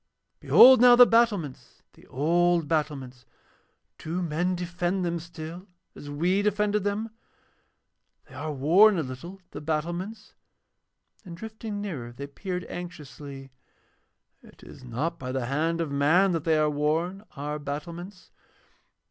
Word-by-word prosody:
'Behold 260 Hz, -1 st, +8 dB
now 245 Hz, -1 st, +8 dB
the 245 Hz, 0 st, +9 dB
battlements, 220 Hz, -, 0 dB
the -, -, -20 dB
old 170 Hz, +3 st, +1 dB
battlements. 140 Hz, -6 st, -3 dB, 0.8 s
Do 175 Hz, +3 st, -3 dB
men 175 Hz, +3 st, -1 dB
defend 180 Hz, +1 st, -2 dB
them 170 Hz, 0 st, -2 dB
still 170 Hz, +2 st, -9 dB, 0.3 s
as 145 Hz, -, -10 dB
we 175 Hz, +7 st, +1 dB
defended 210 Hz, 0 st, 0 dB
them? 210 Hz, +2 st, -2 dB, 1.1 s
They -, -, -18 dB
are 155 Hz, -, -5 dB
worn 175 Hz, +9 st, +5 dB
a 160 Hz, -, 0 dB
little, 140 Hz, +9 st, -8 dB
the -, -, -8 dB
battlements,' 170 Hz, +7 st, -4 dB, 0.9 s
and 175 Hz, -4 st, -10 dB
drifting 220 Hz, 0 st, -6 dB
nearer 145 Hz, -13 st, -5 dB
they 135 Hz, +4 st, -8 dB
peered 180 Hz, +5 st, -5 dB
anxiously. 145 Hz, -6 st, -9 dB, 0.9 s
'It -, -, -18 dB
is -, -, -13 dB
not 145 Hz, +8 st, -3 dB
by 130 Hz, -2 st, -5 dB
the 130 Hz, -2 st, -2 dB
hand 160 Hz, +6 st, -1 dB
of 165 Hz, -4 st, -2 dB
man 160 Hz, +8 st, +3 dB
that 165 Hz, -3 st, -2 dB
they 160 Hz, -1 st, +3 dB
are 155 Hz, 0 st, +3 dB
worn, 160 Hz, +6 st, -1 dB
our 150 Hz, +1 st, -4 dB
battlements. 170 Hz, +6 st, -7 dB
170 Hz, 135 wpm, -26 LUFS, 145-190 Hz, 1.1 s, the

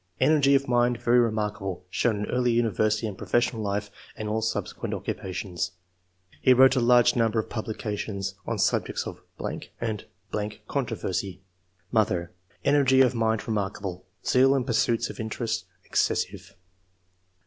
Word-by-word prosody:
Energy 140 Hz, 0 st, +5 dB
of 140 Hz, 0 st, +1 dB
mind 120 Hz, 0 st, +2 dB
very 120 Hz, +1 st, +4 dB
remarkable, 105 Hz, -5 st, -1 dB
shown 115 Hz, +2 st, +1 dB
in 105 Hz, 0 st, -2 dB
early 125 Hz, -1 st, +2 dB
university 110 Hz, -1 st, +1 dB
and 100 Hz, -3 st, -5 dB
professional 120 Hz, -1 st, +1 dB
life 100 Hz, 0 st, -2 dB, 0.3 s
and 110 Hz, -, -4 dB
all 110 Hz, +1 st, 0 dB
subsequent 110 Hz, 0 st, -2 dB
occupations. 90 Hz, -1 st, -4 dB, 0.7 s
He 130 Hz, -, +6 dB
wrote 130 Hz, +2 st, +7 dB
a -, -, +3 dB
large 120 Hz, 0 st, +5 dB
number 115 Hz, -2 st, +2 dB
of 110 Hz, -, -1 dB
publications 105 Hz, -3 st, -3 dB
on -, -, -1 dB
sub -, -, +2 dB
jects -, -, -3 dB
of... -, -, -7 dB, 0.6 s
and.... 110 Hz, -3 st, -3 dB, 0.6 s
controversy. 95 Hz, -1 st, -3 dB, 0.5 s
Mother 100 Hz, -7 st, +1 dB, 0.2 s
— -, -, -33 dB
^Energy 135 Hz, -2 st, +5 dB
of 125 Hz, -, 0 dB
mind 110 Hz, -2 st, 0 dB
remarkable; 100 Hz, -4 st, -3 dB, 0.2 s
zeal 135 Hz, +2 st, +5 dB
in 135 Hz, -, +1 dB
pursuit 115 Hz, -1 st, +1 dB
of -, -, -13 dB
interests, 110 Hz, +1 st, -2 dB, 0.2 s
excessive." -, -, -1 dB
110 Hz, 140 wpm, -26 LUFS, 105-125 Hz, 0.7 s, wrote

